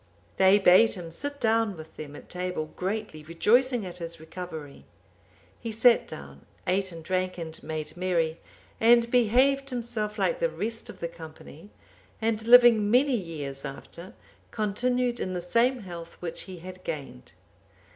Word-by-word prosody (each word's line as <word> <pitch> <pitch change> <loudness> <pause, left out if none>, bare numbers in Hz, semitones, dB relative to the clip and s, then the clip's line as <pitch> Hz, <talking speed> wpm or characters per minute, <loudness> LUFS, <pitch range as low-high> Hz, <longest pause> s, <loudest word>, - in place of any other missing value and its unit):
They 190 +1 +6
bade 205 +3 +6
him 170 -3 -8
sit 285 - -5
down 225 -3 +1
with 160 0 -11
them 145 -1 -8
at - - -12
table, 180 -3 -4
greatly 195 -4 -3
rejoicing 230 - +2
at 180 -1 -7
his 170 -1 -6
recovery. 160 -3 -8 0.8
He 230 - -5
sat 230 +2 +5
down, 70 +2 -10 0.2
ate 190 +1 0
and 165 -1 -9
drank 185 +1 -1
and 160 -2 -5
made 155 0 -5
merry, 170 -3 0 0.4
and 235 +1 +5
behaved 260 +4 +3
himself 230 -4 -3
like - - +1
the - - +1
rest 225 - -4
of - - -11
the 170 - -1
company; 160 +2 -12 0.5
and 220 0 -1
living 240 -4 +7
many 255 +4 +4
years 150 -9 -5
after, 170 +6 -7 0.3
continued 240 +3 0
in 185 - -3
the 180 - -2
same 235 +8 +1
health 170 -3 -9
which 170 -2 -3
he 185 - -7
had 185 +2 -10
gained. 140 - -7
185 Hz, 155 wpm, -27 LUFS, 165-230 Hz, 0.8 s, living